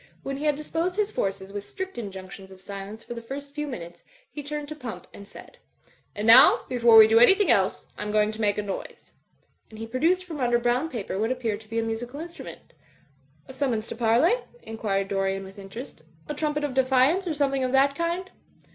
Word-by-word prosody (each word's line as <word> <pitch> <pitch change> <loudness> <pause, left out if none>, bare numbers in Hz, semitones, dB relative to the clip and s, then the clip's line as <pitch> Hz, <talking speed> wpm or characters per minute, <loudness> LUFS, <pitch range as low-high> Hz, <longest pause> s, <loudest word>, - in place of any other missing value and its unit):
When 275 0 -4
he 295 - -4
had 300 -1 +2
disposed 330 +4 -2
his 420 0 0
forces, 195 - -3
with 205 -1 -5
strict 380 - -7
injunctions 190 -3 -8
of 190 - -13
silence 200 +3 -8
for - - -7
the 235 - -7
first 280 +4 -8
few 300 0 -4
minutes^ 175 -10 -8 0.3
he 295 - -6
turned. 295 0 -5
to 305 - -6
Pump, 250 -6 -8
and 200 - -12
said, - - -14 0.6
"And 210 - -3
now, 230 +4 +8
before 235 -3 +5
we 220 -1 +10
do 225 +1 +5
anything 385 - +6
else, 195 -4 +1
I'm 210 0 -3
going 210 0 +2
to 220 +1 -7
make 205 -1 +1
a 210 - -1
noise.'^ 195 -2 -7 0.6
And 220 - -12
he 225 - -5
produced 325 +11 +1
from 320 -5 -7
under 240 -2 +2
brown 245 +6 0
paper 200 -6 -4
what 225 +3 0
appeared 230 -5 -2
to 215 - -19
be 225 - -4
a 230 - +1
musical 235 +5 -5
instrument 340 +1 -10 0.7
"A - - -10
summons 245 -5 -1
to - - -5
parley?" 235 - +3 0.3
inquired 200 -3 -2
Dorian, 195 -1 -1
with 195 +1 -12
in 195 0 -10
terest, 235 - -9 0.3
"a - - -3
trumpet 295 0 -2
of 290 -3 -2
defiance, 265 +8 +3
or 320 - -1
something 275 -2 0
of 255 - -1
that 275 +1 +4
kind?" 340 +4 -3
240 Hz, 215 wpm, -25 LUFS, 210-290 Hz, 0.7 s, we